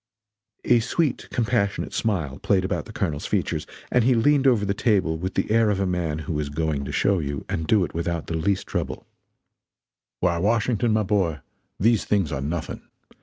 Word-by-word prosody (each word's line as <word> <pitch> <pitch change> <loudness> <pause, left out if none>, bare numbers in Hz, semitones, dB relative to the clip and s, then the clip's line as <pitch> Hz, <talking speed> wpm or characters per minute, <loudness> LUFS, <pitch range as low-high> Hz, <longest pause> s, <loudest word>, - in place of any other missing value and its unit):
A 120 - +5
sweet, 145 +5 -1
compassionate 110 -4 0
smile 80 -11 -1
played 95 -2 +1
about - - -2
the 110 - -10
Colonel's 80 -9 -2
features, - - -1 0.2
and 125 - +4
he 125 +1 +4
leaned 140 +4 +3
over 115 -6 +3
the 100 - 0
table 100 -7 +1
with 95 +2 -4
the 95 - 0
air 115 -1 +4
of 100 -2 0
a 100 - +1
man 85 -4 -1
who 75 +1 -2
is 75 -1 -2
"going 75 -1 -1
to - - -5
show 100 -2 +2
you" 70 -3 -4
and 80 -1 -3
do 100 -1 +4
it - - -10
without 85 -1 -2
the - - -5
least 95 +4 0
trouble: - - -4 1.1
"Why 85 -2 +1
Washington, 115 +3 +1
my 110 0 +2
boy, 95 -7 0 0.4
these 110 0 +3
things 100 -7 +1
are 65 - -2
nothing. 80 +4 -4
95 Hz, 190 wpm, -24 LUFS, 80-110 Hz, 1.1 s, A